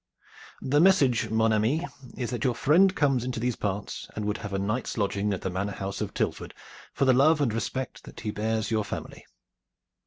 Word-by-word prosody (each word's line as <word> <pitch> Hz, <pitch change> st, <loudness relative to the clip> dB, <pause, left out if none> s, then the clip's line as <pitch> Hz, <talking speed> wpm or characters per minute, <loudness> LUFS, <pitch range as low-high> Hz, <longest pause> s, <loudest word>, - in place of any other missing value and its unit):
"The 145 Hz, +3 st, +2 dB
message, 145 Hz, -11 st, +4 dB
mon 110 Hz, 0 st, +2 dB
ami, 120 Hz, +11 st, +1 dB, 0.3 s
is 125 Hz, -2 st, -3 dB
that 120 Hz, -2 st, -3 dB
your 125 Hz, -3 st, +1 dB
friend 185 Hz, +10 st, +4 dB
comes 135 Hz, -5 st, +2 dB
into 125 Hz, -2 st, -3 dB
these 120 Hz, 0 st, 0 dB
parts 100 Hz, 0 st, -4 dB
and 105 Hz, -, -3 dB
would 105 Hz, 0 st, -1 dB
have 105 Hz, -2 st, -6 dB
a 95 Hz, -, -1 dB
night's 105 Hz, +7 st, -2 dB
lodging 100 Hz, 0 st, 0 dB
at 95 Hz, -, -2 dB
the 95 Hz, -, -3 dB
manor 100 Hz, +2 st, -2 dB
house 95 Hz, 0 st, -5 dB
of -, -, -4 dB
Tilford -, -, -2 dB, 0.4 s
for 140 Hz, -, 0 dB
the 130 Hz, -, +5 dB
love 150 Hz, +5 st, +5 dB
and 130 Hz, -7 st, +1 dB
respect 130 Hz, +3 st, -4 dB
that -, -, -11 dB
he 110 Hz, -2 st, -2 dB
bears 110 Hz, +1 st, -1 dB
your 110 Hz, -1 st, +1 dB
family." 105 Hz, -, -7 dB
115 Hz, 205 wpm, -27 LUFS, 105-130 Hz, 0.4 s, the